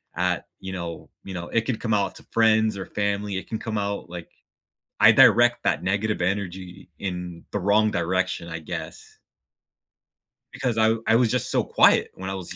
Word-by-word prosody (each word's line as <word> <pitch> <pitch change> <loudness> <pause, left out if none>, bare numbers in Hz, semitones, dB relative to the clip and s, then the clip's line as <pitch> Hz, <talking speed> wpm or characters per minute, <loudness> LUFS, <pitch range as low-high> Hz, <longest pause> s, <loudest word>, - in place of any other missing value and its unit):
at, - - -1
you 95 0 -7
know, 85 -2 -6
you 95 - -8
know, 85 -1 -6
it 115 - +1
can 130 - -1
come 115 -1 -2
out 100 -2 0
to - - -13
friends 110 -2 +3
or 95 - -5
family. 100 -1 -2
It 95 - -6
can 110 - -3
come 110 -2 -4
out, 100 -3 -3
like 85 -1 -8 0.7
I - - +8
direct 120 0 +5
that - - 0
negative 100 +1 -1
energy 95 -1 -4
in 90 -3 -5
the 105 - -2
wrong 105 +3 +3
direction, 85 -1 -1
I 80 - -5
guess. 80 0 -8 1.3
Because 120 -3 -2
I 110 0 +4
I 115 - +4
was 115 -1 +3
just - - -1
so - - +2
quiet - - +4
when 95 +1 -6
I 95 - -3
was 90 -2 -7
100 Hz, 185 wpm, -24 LUFS, 90-110 Hz, 1.3 s, I